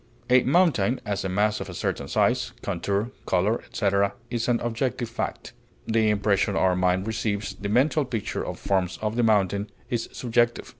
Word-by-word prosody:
A 125 0 +7
mountain, 135 - +3
as 100 -2 -2
a 95 - -2
mass 105 +3 +1
of - - -6
a - - -7
certain - - -2
size, - - +1
contour, 100 +4 -1 0.2
color, 95 +5 +1
etc., 100 -1 0 0.2
is 120 -2 -1
an 120 -1 +2
objective 120 +1 -2
fact; 115 - -4 0.3
the 110 -1 +2
impression 100 -1 +1
our 95 -1 +3
mind 90 +1 +1
receives, 110 -2 -2
the 100 - -5
mental 140 +7 +3
picture 120 -6 -3
it - - -4
forms 95 -2 0
of 105 +1 -1
the 120 - +2
mountain, 100 -2 +2 0.2
is 120 -2 -1
subjective. 120 -1 0
105 Hz, 170 wpm, -25 LUFS, 100-120 Hz, 0.3 s, A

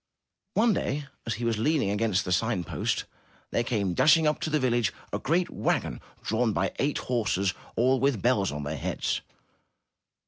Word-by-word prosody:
One 225 +1 +4
day 145 -4 -2 0.2
as 115 - 0
he 120 +2 -4
was 115 -2 0
leaning 135 -4 +2
against 105 -2 +1
the 90 - -3
sign 95 0 +1
post, 85 0 -2 0.5
there 120 - +1
came 105 -7 0
dashing 155 - +5
up 150 0 +2
to - - -2
the 155 0 +2
village 120 -5 +2
inn - - -18 0.2
a - - 0
great 170 +5 +1
wagon - - -1 0.2
drawn 110 0 +1
by - - 0
eight 145 +1 +1
horses, 105 -6 0 0.2
all 130 +3 +3
with 135 -5 +2
bells 110 -4 +2
on 75 0 -4
their 75 +1 -3
heads. - - -2
115 Hz, 180 wpm, -27 LUFS, 100-140 Hz, 0.5 s, dashing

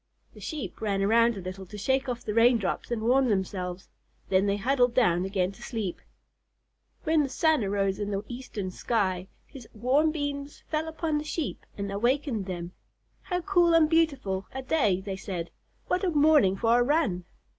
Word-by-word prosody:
The - - -14
Sheep 305 -8 -6
ran 200 -2 0
around 230 +2 +4
a - - -5
little 185 +1 -7
to 210 - -9
shake 265 +5 0
off 245 -1 -4
the 210 - -2
rain 235 +2 +5
drops 200 -5 -3
and 235 -2 -2
warm 255 +3 +3
themselves, 190 -2 -2 0.4
then 190 +1 +3
they 200 0 +1
huddled 245 +2 +2
down 180 -8 +3
again 190 -1 0
to 195 - -16
sleep. 215 -7 -4 1.0
When 315 -2 +3
the 280 - -1
sun 315 -1 +2
arose 195 0 0
in 205 -1 -2
the 200 0 -2
eastern 235 -6 -5
sky, 190 -3 -1 0.2
his 255 -5 -12
warm 260 +8 +3
beams 285 -2 -4
fell 315 +1 -1
upon 315 -1 -1
the - - -5
Sheep 305 0 -4
and 200 -1 -3
awakened 235 0 0
them. 175 -1 -5 0.5
"How 360 -1 -2
cool 350 -3 +3
and 320 -2 +6
beautiful 280 - +1
a 265 0 -5
day," 215 - +2
they 190 -1 -5
said. 185 -4 -5 0.3
"What 365 - 0
a 375 - +2
morning 295 - +4
for 230 +2 +3
a - - +4
run!" 245 - +1
230 Hz, 185 wpm, -27 LUFS, 195-290 Hz, 1.0 s, and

